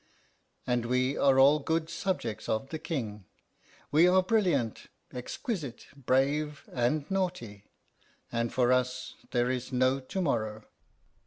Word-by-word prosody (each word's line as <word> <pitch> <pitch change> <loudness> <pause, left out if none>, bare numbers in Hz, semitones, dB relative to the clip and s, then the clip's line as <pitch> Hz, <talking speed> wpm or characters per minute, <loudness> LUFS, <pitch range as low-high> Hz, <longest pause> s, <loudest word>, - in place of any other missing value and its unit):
And 120 -1 0
we 130 +2 +1
are 135 -1 +4
all 140 +3 +6
good 160 +2 -1
subjects 165 - -3
of 120 +5 -1
the 160 - -4
King. 110 - -4 0.7
We 160 +4 +6
are 185 +1 +5
brilliant, 180 - +1 0.3
exquisite, 135 - -5
brave, 140 +3 0
and 130 +4 +1
naughty; 175 - -2 0.7
and 115 0 -1
for 125 -1 +2
us 125 0 -1 0.2
there 120 +1 +1
is 130 0 -4
no 130 +1 +2
to 135 +8 -5
morrow." 110 - -1
130 Hz, 130 wpm, -29 LUFS, 120-155 Hz, 0.7 s, all